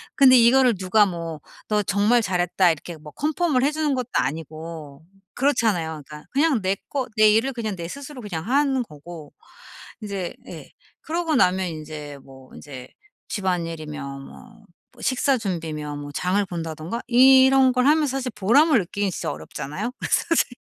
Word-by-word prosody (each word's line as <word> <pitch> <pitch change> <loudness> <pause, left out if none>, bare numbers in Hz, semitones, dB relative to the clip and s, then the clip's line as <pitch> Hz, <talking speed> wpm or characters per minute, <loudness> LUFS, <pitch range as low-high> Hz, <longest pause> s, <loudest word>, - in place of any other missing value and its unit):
근데 260 -2 +7
이거를 245 0 +5
누가 195 +3 +3
뭐 165 -4 -6 0.3
"너 210 -1 +1
정말 205 +5 +2
잘했다." 180 -2 +2
이렇게 160 +2 -7
뭐 150 0 -12
컨펌을 300 -3 0
해주는 300 -1 0
것도 250 -1 -4
아니고 155 0 -4 0.3
그렇잖아요. 200 - 0
그러니까 150 0 -10
그냥 280 -4 +2
내 190 +1 0
거 270 -3 -3
내 215 0 +6
일을 225 +5 +2
그냥 220 -4 -4
내 170 -2 -6
스스로 280 - -9
그냥 175 -6 -5
하는 270 0 +2
거고 155 -3 -12 0.7
이제 200 -4 -4
예. - - -10 0.3
그러고 325 -1 -2
나면 185 -4 +2
인제 155 -3 -8
뭐 130 -1 -16
인제 130 -3 -10 0.4
집안일이며 160 -7 -4
뭐 220 - -14 0.3
뭐 - - -15
식사 260 0 +1
준비며 160 -7 -4
뭐 145 0 -7
장을 185 +6 0
본다든가 165 +4 -5
이런 265 +1 +6
걸 250 +1 +2
하면 305 +1 +4
사실 265 -2 -3
보람을 255 +9 +4
느끼긴 200 +1 -1
진짜 180 - -4
어렵잖아요, 150 - -6 0.2
사실. 310 -6 +1
200 Hz, 320 characters per minute, -23 LUFS, 160-255 Hz, 0.7 s, 근데